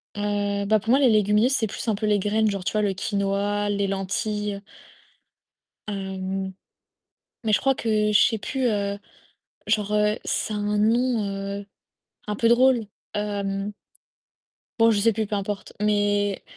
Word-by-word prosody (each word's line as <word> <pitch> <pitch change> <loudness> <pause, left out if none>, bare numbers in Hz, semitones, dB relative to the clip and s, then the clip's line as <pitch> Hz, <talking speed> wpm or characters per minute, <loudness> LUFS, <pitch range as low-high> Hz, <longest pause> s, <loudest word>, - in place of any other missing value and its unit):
Heu, 205 -1 -1
bah 215 +1 +3
pour 220 - -7
moi 255 - +6
les 270 - +5
légumineuses, 210 +3 +3
c'est 250 -5 +1
plus 215 - -7
un 220 - +2
peu 215 +1 -2
les 210 - +3
graines 210 +2 +1
genre 195 -2 -3
tu - - 0
vois 215 - +1
le 205 -2 +1
quinoa, 200 +1 -1
les 200 0 0
lentilles 200 +1 -2 1.3
hem, 190 -1 -4 0.9
mais 215 - +1
je - - +4
crois 270 0 +2
que 215 -3 +1
je 210 - +6
sais 225 - +3
plus, 260 +5 -2
heu, 200 -2 -1 0.7
genre, 210 -1 0
heu, 210 0 +2
ça 215 - -2
a - - -2
un 210 0 -1
nom, 230 +1 +2 0.4
heu, 200 - -12 0.6
un 210 - -2
peu 230 - +2
drôle, 240 -1 +4 0.3
hem 200 -1 -2 1.1
bon, 225 0 +6
je 215 - +2
sais 225 +2 +4
plus, 220 +1 -2
peu 205 - -2
importe, 200 0 -4
mais 205 -1 +1
210 Hz, 165 wpm, -24 LUFS, 200-220 Hz, 1.3 s, moi